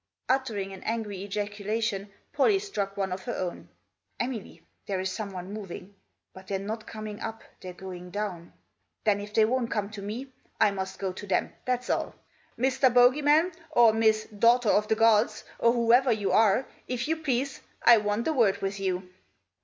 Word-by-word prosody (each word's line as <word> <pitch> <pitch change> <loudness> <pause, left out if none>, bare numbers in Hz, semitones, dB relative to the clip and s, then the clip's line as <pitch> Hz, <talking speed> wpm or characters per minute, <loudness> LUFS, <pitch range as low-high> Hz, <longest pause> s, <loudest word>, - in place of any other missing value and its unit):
Uttering 225 -7 -1
an 190 - -10
angry 215 -4 -3
ejaculation 205 +1 -3 0.2
Pollie 410 - +4
struck 205 - -4
one 195 -1 -1
of 185 +1 -5
her 240 - -3
own. 180 -2 -5 0.3
" - - -48
Emily, 240 -4 -4 0.2
there 195 -2 -1
is 190 0 -2
someone 195 -2 -6
moving; 200 -1 -8 0.4
but 190 0 -13
they're 195 - -1
not 215 +3 -5
coming 215 -1 -7
up, 225 0 -5 0.2
they're 185 - -7
going 180 -1 -9
down. 185 -4 -4 0.5
Then 205 -2 +2
if 205 +1 -7
they 215 0 +4
won't 240 +1 0
come 210 -1 -2
to 210 -1 -7
me 240 +7 -6 0.3
I 210 - +5
must 190 -1 -5
go 190 -2 -3
to 205 - -9
them, 190 - 0
that's 250 0 -1
all. - - -1 0.4
Mr. 260 +1 +3
Bogey 245 +4 +5
man, 305 +5 +4 0.2
or 240 -6 +5
Miss 220 -1 +3
Daughter 230 +2 +3
of 210 +1 +3
the 220 - +2
gods, 225 0 +3 0.2
or 235 - +5
whoever 240 +2 +4
you 205 -4 0
are, 220 +5 +4 0.2
if 250 +1 -2
you 320 - +1
please, 275 -3 -1 0.2
I 240 - +8
want 210 +3 -1
a 320 - +2
word 225 -8 +3
with 195 0 -3
you." 185 -1 -2
215 Hz, 185 wpm, -28 LUFS, 195-240 Hz, 0.5 s, I